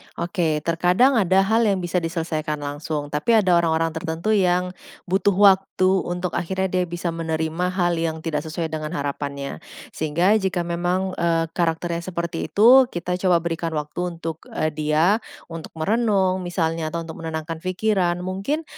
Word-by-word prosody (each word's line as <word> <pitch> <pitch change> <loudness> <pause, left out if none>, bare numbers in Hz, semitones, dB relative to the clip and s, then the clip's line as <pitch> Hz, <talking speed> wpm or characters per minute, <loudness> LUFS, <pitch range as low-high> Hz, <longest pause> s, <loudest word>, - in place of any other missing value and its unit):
Oke, 170 -4 -1
terkadang 180 - +3
ada 190 -1 +4
hal 220 +3 +2
yang 195 -2 +1
bisa 175 +1 0
diselesaikan 160 -3 -3
langsung, 145 0 -4
tapi 150 +11 +2
ada 185 -5 +4
orang-orang 165 -1 +1
tertentu 160 +5 -3
yang 180 -3 +2 0.3
butuh 190 +2 +1
waktu 195 -1 +5 0.4
untuk 180 +1 -2
akhirnya 190 +2 -1
dia 185 -1 +1
bisa 170 0 -3
menerima 165 +1 -2
hal 175 -2 0
yang 160 -1 -2
tidak 160 -3 -1
sesuai 160 0 -4
dengan 155 +1 -4
harapannya. 140 -1 -4 0.3
Sehingga 170 +7 +2
jika 190 -3 -1
memang, 175 +2 -1
eee, 165 -1 +1
karakternya 170 0 -1
seperti 170 -2 -3
itu, 250 +5 +6
kita 180 -3 -3
coba 180 -3 +3
berikan 165 -1 -2
waktu 170 +4 -3
untuk, 165 -1 -6
e 155 - -1
dia, 155 +6 +2 0.3
untuk 165 -1 -8
merenung 195 +1 +1
misalnya 165 -2 -1
atau 170 0 -2
untuk 160 -1 -9
menenangkan 160 0 -4
pikiran. 185 -1 0
Mungkin 195 - -2
170 Hz, 155 wpm, -22 LUFS, 160-185 Hz, 0.4 s, itu